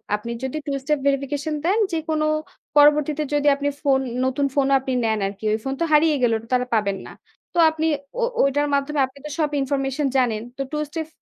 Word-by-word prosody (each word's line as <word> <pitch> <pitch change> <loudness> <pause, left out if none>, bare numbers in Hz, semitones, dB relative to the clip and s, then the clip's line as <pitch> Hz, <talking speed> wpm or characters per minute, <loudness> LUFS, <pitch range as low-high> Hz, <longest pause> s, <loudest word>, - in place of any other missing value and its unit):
আপনি 210 +3 -6
যদি 265 +3 -3
two 280 -1 -1
step 300 0 0
verification 280 +2 -1
দেন 390 +6 +2
যেকোনো 315 -1 -1 0.5
পরবর্তীতে 300 +1 +4
যদি 290 0 +1
আপনি 285 +1 -1
ফোন, 275 -3 +3 0.3
নতুন 260 +2 0
ফোনও 275 -1 +3
আপনি 260 0 -3
নেন 220 -1 +1
আরকি। 200 +2 -8
ওই - - +1
ফোন 270 - -2
তো - - +3
হারিয়ে 305 0 +5
গেল। 240 -2 +3
ওটা 225 - -12
তো - - +4
আর - - -1
পাবেন 200 -3 0
না। - - -10 0.4
তো - - +2
আপনি 320 0 -1 0.3
ও - - +2 0.2
ওইটার 290 +2 +2
মাধ্যমে 280 +1 -1
আপনি 260 +1 -16
তো - - -5
সব 300 -2 +2
information 270 +1 -1
জানেন। 235 -4 +1 0.2
তো 275 - -3
two 300 0 -1
step 320 0 -4
280 Hz, 210 wpm, -22 LUFS, 260-300 Hz, 0.5 s, হারিয়ে